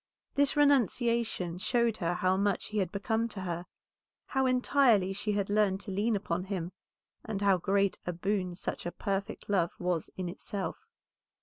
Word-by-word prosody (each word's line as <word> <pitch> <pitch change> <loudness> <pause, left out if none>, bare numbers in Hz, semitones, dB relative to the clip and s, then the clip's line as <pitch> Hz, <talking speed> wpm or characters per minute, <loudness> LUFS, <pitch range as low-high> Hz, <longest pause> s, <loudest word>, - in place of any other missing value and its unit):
This 285 -1 +2
renunciation 235 -9 +2
showed 235 +1 +1
her 175 -2 0
how 185 +1 +2
much 200 0 0
he 215 0 -1
had 185 -3 0
become 220 +3 0
to 205 -3 -7
her, 175 -1 -4 0.6
how 265 -1 +1
entirely 250 -6 +3
she 210 +2 -2
had 200 -1 0
learned 205 -2 +2
to 205 - -6
lean 210 +4 +1
upon 180 -2 -2
him, 185 -3 -3 0.5
and 215 -3 -3
how 195 -2 +4
great 195 +2 +1
a - - +1
boon 185 0 -1
such 175 - -4
perfect 195 0 -3
love 180 -4 +1
was 180 -3 -1
in 185 -1 -2
itself. 200 - -5
200 Hz, 165 wpm, -30 LUFS, 185-220 Hz, 0.6 s, how